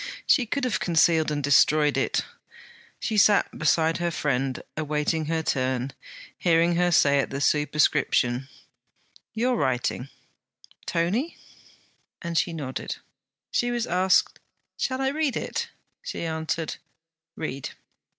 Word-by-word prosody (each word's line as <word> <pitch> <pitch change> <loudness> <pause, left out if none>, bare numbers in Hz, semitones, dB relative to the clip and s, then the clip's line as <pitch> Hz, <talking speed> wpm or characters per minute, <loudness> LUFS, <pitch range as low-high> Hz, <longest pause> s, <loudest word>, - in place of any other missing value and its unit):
She 250 -5 +3
could 280 +4 -2
have 250 -4 0
concealed 165 -2 +3
and 145 -1 -2
destroyed 145 +1 +4
it. - - 0 0.7
She 220 - -2
sat 205 0 +4
beside 160 0 +2
her 175 0 0
friend, 135 -5 -1
awaiting 155 +1 -1
her 160 +1 -1
turn, 130 -2 -1 0.5
hearing 170 0 +3
her 175 +1 +2
say 140 -4 +4
at - - 0
the 135 - -4
superscription: 145 -3 +1 0.9
'Your 245 +3 +1
writing, 130 - -1 0.8
Tony?' 205 - -1 0.8
and 170 0 -5
she 170 - +1
nodded. 140 -5 -5 0.6
She 245 - +1
was 240 -1 -1
asked: 185 +1 +2 0.4
'Shall 260 0 -2
I 265 - +2
read 295 -1 -1
it?' - - -3 0.3
She - - -5
answered: 160 0 -3 0.6
'Read.' 140 -4 -5
160 Hz, 120 wpm, -25 LUFS, 145-185 Hz, 0.9 s, destroyed